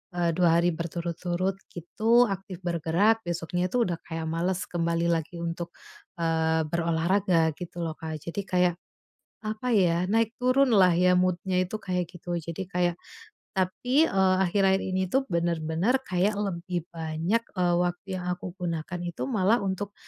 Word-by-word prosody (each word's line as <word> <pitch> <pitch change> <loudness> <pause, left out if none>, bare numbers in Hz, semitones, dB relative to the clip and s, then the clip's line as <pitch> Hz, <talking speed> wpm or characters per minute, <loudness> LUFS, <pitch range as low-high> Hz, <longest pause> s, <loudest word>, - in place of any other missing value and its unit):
eee, 170 -1 +2
2 170 -2 +4
hari 175 0 +2
berturut-turut 175 +2 -2 0.2
gitu 225 +8 +3
aktif 195 -1 -5
bergerak, 175 +6 +2
besoknya 175 +1 -2
itu 245 -2 +2
udah 175 -2 -2
kayak 165 -1 -4
males 175 +3 -1
kembali 170 0 0
lagi 165 +1 -3
untuk, 170 0 -4 0.5
eee, 160 -1 +1
berolahraga 170 0 +2
gitu 175 -1 -7
loh, 160 - -3
Kak. 160 -1 -5
Jadi 170 +4 -3
kayak, 180 -1 +2 0.7
apa 215 +3 -3
ya, 180 -4 +3
naik 225 +1 +2
turunlah 250 -8 +5
ya 180 +1 +4
mood-nya 185 +1 0
itu, 190 +4 -4
kayak 180 -3 -1
gitu. 175 -1 -5
Jadi 170 +3 -5
kayak 175 -2 0 0.6
tapi, 220 +9 +1
eee, 190 -1 +3
akhir-akhir 190 +1 +3
ini 185 0 -1
tuh 265 +9 +1
bener-bener 170 +5 +1
kayak 190 -1 +1
lebih 175 -3 -3
banyak, 165 +6 -1
eee, 180 -2 +2
waktu 175 +2 -1
yang 180 - -6
aku 180 +1 -7
gunakan 175 -1 -3
itu 175 -1 -4
malah 220 0 +2
untuk, 200 +1 -3
180 Hz, 150 wpm, -27 LUFS, 170-195 Hz, 0.7 s, turunlah